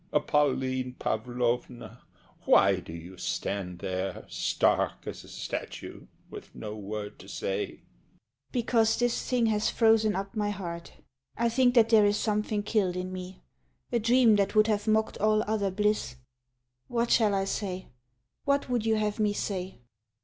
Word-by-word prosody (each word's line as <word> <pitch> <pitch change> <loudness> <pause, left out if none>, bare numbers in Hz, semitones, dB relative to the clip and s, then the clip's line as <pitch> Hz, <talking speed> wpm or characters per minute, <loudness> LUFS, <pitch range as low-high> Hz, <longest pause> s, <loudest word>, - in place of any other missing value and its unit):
Pauline 130 -3 +1
Pavlovna, 120 +1 -2 0.4
why 95 -1 +5
do 85 - -10
you 85 +3 -9
stand 90 -2 -3
there 95 +2 -4
Stark - - 0
as - - -7
a - - -15
statue, - - -6 0.2
with - - -11
no 105 0 -6
word 105 0 -6
to - - -12
say? 100 +1 -2
SHE. - - -27 0.7
Because 225 -2 +2
this 245 -1 0
thing 245 -2 +2
has 215 -1 +1
frozen 220 -3 +3
up 195 +3 -4
my 210 -1 0
heart. 170 -4 -6 0.4
I 235 0 +2
think 245 +1 +3
that 225 -2 +6
there 215 -3 +6
is 205 0 +2
something 210 -1 -1
killed 205 -4 +1
in 180 0 -4
me, 185 0 -8 0.5
A 240 - +2
dream 235 -1 +5
that 200 +1 0
would 215 0 +6
have 210 -1 0
mocked 220 0 +1
all 215 +1 +3
other 210 -2 0
bliss. 210 -8 0 0.7
What 235 0 0
shall 215 -3 +4
I 195 0 0
say? 190 -2 -3 0.6
What 280 -1 +1
would 240 -3 +1
you 220 - +3
have 210 0 -1
me 210 -1 +2
say? 185 - -4
205 Hz, 155 wpm, -28 LUFS, -, 0.7 s, that